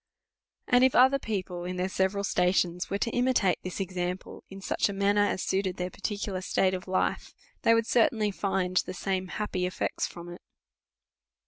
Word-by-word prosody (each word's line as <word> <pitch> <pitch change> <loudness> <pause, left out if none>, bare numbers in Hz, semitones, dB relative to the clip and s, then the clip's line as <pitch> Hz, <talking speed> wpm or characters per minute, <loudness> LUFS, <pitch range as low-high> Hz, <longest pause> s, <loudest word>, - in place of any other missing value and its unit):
And 250 0 +5
if 260 - +4
other 260 +2 +6
people, 185 -6 -4
in 180 +1 -4
their 180 +1 -1
several 190 +1 0
stations, 180 -2 +1
were 200 - -1
to 230 +3 -1
imitate 245 -7 +2
this 185 +2 -6
example, 180 -1 -4
in 195 - -9
such 195 - 0
a - - -3
manner 200 +1 +2
as 205 -2 0
suited 190 -1 -1
their 180 0 -3
particu 205 0 -4
lar 185 -1 -3
state 190 0 +1
of 185 0 -5
life, 185 0 -1 0.3
they 230 - +5
would 230 0 +2
certainly 225 -3 +2
find 190 -2 -1
the 185 - 0
same 190 0 -2
happy 185 -2 -2
effects 180 - -2
from 170 0 -10
it. 175 - -10
190 Hz, 185 wpm, -28 LUFS, 180-205 Hz, 0.3 s, other